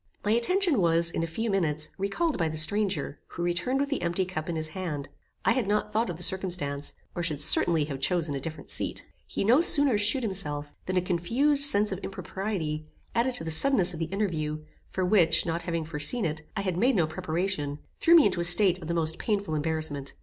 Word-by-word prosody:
My 210 Hz, -, +1 dB
attention 305 Hz, -, +2 dB
was, 170 Hz, 0 st, +3 dB
in -, -, -2 dB
a 165 Hz, -, -1 dB
few 220 Hz, +7 st, -3 dB
minutes, 155 Hz, -5 st, 0 dB
recalled 235 Hz, -, -1 dB
by 165 Hz, -2 st, 0 dB
the 155 Hz, -, -5 dB
stranger, 185 Hz, -2 st, 0 dB
who 175 Hz, -, -6 dB
returned 175 Hz, +10 st, -1 dB
with 280 Hz, 0 st, -1 dB
the 280 Hz, -, -2 dB
empty 175 Hz, +2 st, -1 dB
cup 170 Hz, -3 st, -5 dB
in 170 Hz, -, -2 dB
his 155 Hz, 0 st, -2 dB
hand. 155 Hz, -5 st, -5 dB, 0.4 s
I -, -, +4 dB
had 250 Hz, -6 st, 0 dB
not 210 Hz, +1 st, -1 dB
thought 220 Hz, 0 st, +1 dB
of 170 Hz, -, -5 dB
the 175 Hz, -, -5 dB
circumstance, 175 Hz, -7 st, -2 dB, 0.2 s
or 175 Hz, -, -4 dB
should 155 Hz, -4 st, -2 dB
certainly 160 Hz, +1 st, +4 dB
have 140 Hz, -3 st, -6 dB
chosen 160 Hz, +1 st, -1 dB
a 140 Hz, -, -3 dB
different 160 Hz, +3 st, -7 dB
seat. -, -, -1 dB, 0.2 s
He -, -, -3 dB
no 245 Hz, +9 st, +5 dB
sooner 285 Hz, -, +6 dB
shewed 230 Hz, +5 st, +2 dB
himself, 150 Hz, -8 st, -2 dB, 0.2 s
than 185 Hz, 0 st, -1 dB
a 180 Hz, -, +2 dB
confused 245 Hz, -, +2 dB
sense 210 Hz, -7 st, +4 dB
of 190 Hz, -, -3 dB
impropriety, 190 Hz, -6 st, -4 dB, 0.3 s
added 240 Hz, +2 st, 0 dB
to -, -, -4 dB
the 160 Hz, -, -4 dB
suddenness 185 Hz, -, +4 dB
of 165 Hz, -, -7 dB
the 165 Hz, -, -1 dB
interview, 160 Hz, -5 st, -3 dB, 0.3 s
for 185 Hz, -, -2 dB
which, 170 Hz, -4 st, +3 dB
not 170 Hz, 0 st, -2 dB
having 165 Hz, -2 st, -3 dB
foreseen 160 Hz, +9 st, 0 dB
it, 155 Hz, 0 st, -3 dB, 0.2 s
I -, -, 0 dB
had 185 Hz, -3 st, -2 dB
made 245 Hz, +6 st, +3 dB
no 175 Hz, -5 st, +3 dB
preparation, 155 Hz, -2 st, -3 dB, 0.2 s
threw 335 Hz, -, +5 dB
me 320 Hz, -, +7 dB
into 185 Hz, -3 st, +1 dB
a -, -, 0 dB
state 185 Hz, +1 st, +5 dB
of 160 Hz, -, -8 dB
the 170 Hz, -, -2 dB
most 160 Hz, 0 st, -1 dB
painful 200 Hz, -6 st, -2 dB
embarrassment. 155 Hz, -2 st, -3 dB
175 Hz, 220 wpm, -27 LUFS, 155-210 Hz, 0.4 s, me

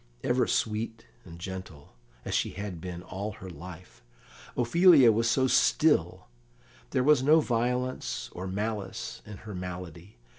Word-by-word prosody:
Ever 125 Hz, +1 st, +2 dB
sweet 110 Hz, +1 st, -2 dB, 0.2 s
and 85 Hz, -2 st, -11 dB
gentle, 95 Hz, -5 st, -8 dB, 0.3 s
as -, -, -3 dB
she -, -, 0 dB
had 100 Hz, -5 st, -6 dB
been 90 Hz, -1 st, -6 dB
all 100 Hz, +4 st, -5 dB
her 95 Hz, -1 st, -10 dB
life, 90 Hz, -1 st, -11 dB, 0.6 s
Ophelia 140 Hz, 0 st, +6 dB
was 115 Hz, +2 st, +1 dB
so 130 Hz, +3 st, +3 dB
still; 130 Hz, -, +2 dB, 0.6 s
there 125 Hz, -, +1 dB
was 150 Hz, -1 st, +5 dB
no 150 Hz, +4 st, +5 dB
violence 125 Hz, -1 st, -1 dB
or 95 Hz, +2 st, -5 dB
malice 105 Hz, 0 st, -4 dB
in 105 Hz, -2 st, -8 dB
her 105 Hz, -, -7 dB
malady. 90 Hz, 0 st, -8 dB
105 Hz, 140 wpm, -28 LUFS, 90-125 Hz, 0.6 s, Ophelia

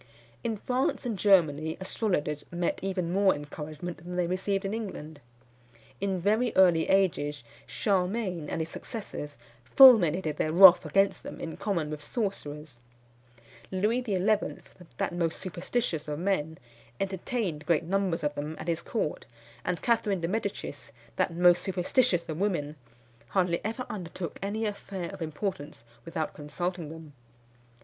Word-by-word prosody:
_" -, -, -20 dB, 0.4 s
In 225 Hz, -2 st, -1 dB
France 255 Hz, +4 st, -1 dB
and 235 Hz, -3 st, -1 dB
Germany 160 Hz, -6 st, +3 dB
astrologers 180 Hz, -7 st, -1 dB
met 175 Hz, 0 st, -1 dB
even 185 Hz, -3 st, -2 dB
more 195 Hz, 0 st, +4 dB
encouragement 150 Hz, +3 st, -7 dB
than 175 Hz, +1 st, -8 dB
they 180 Hz, -1 st, +1 dB
received 190 Hz, +3 st, -1 dB
in 195 Hz, -, -2 dB
England. 160 Hz, -9 st, -6 dB, 0.8 s
In 195 Hz, -2 st, -1 dB
very 215 Hz, +6 st, +2 dB
early 175 Hz, -4 st, +5 dB
ages 155 Hz, -8 st, +1 dB, 0.2 s
Charlemagne 185 Hz, -4 st, -1 dB
and 165 Hz, -, -2 dB
his 160 Hz, -, -3 dB
successors 155 Hz, -8 st, -6 dB, 0.3 s
fulminated 175 Hz, -, +6 dB
their 155 Hz, -, 0 dB
wrath 180 Hz, +1 st, +9 dB
against 195 Hz, 0 st, +2 dB
them -, -, -8 dB
in 165 Hz, -, -5 dB
common 170 Hz, -7 st, -2 dB
with 150 Hz, -1 st, -5 dB
sorcerers. 150 Hz, -, -4 dB, 0.9 s
Louis 210 Hz, +6 st, +1 dB
XI., 210 Hz, -5 st, -1 dB, 0.8 s
that -, -, -1 dB
most 170 Hz, -2 st, -1 dB
superstitious 175 Hz, -2 st, -2 dB
of 150 Hz, -1 st, -3 dB
men, 160 Hz, -3 st, -1 dB, 0.4 s
entertained 190 Hz, -3 st, -3 dB
great 170 Hz, -2 st, +3 dB
numbers 185 Hz, -2 st, 0 dB
of 145 Hz, 0 st, 0 dB
them 150 Hz, +2 st, -4 dB
at 155 Hz, -, -8 dB
his 170 Hz, -1 st, 0 dB
court; 215 Hz, -10 st, -3 dB, 0.4 s
and 175 Hz, -2 st, -2 dB
Catherine 210 Hz, -6 st, +1 dB
de 165 Hz, -, 0 dB
Medicis, 195 Hz, -, -4 dB, 0.3 s
that 185 Hz, -2 st, 0 dB
most 175 Hz, 0 st, +5 dB
superstitious 185 Hz, 0 st, +1 dB
of 155 Hz, 0 st, -4 dB
women, 170 Hz, -7 st, -1 dB, 0.5 s
hardly 180 Hz, -1 st, +1 dB
ever 225 Hz, +4 st, -3 dB
undertook 175 Hz, -4 st, -6 dB
any 210 Hz, +3 st, -2 dB
affair 195 Hz, -4 st, -5 dB
of -, -, -10 dB
importance 155 Hz, -, -4 dB, 0.2 s
without 165 Hz, -2 st, -3 dB
consulting 170 Hz, +2 st, -4 dB
them. 160 Hz, -2 st, -10 dB
180 Hz, 140 wpm, -28 LUFS, 155-200 Hz, 0.9 s, wrath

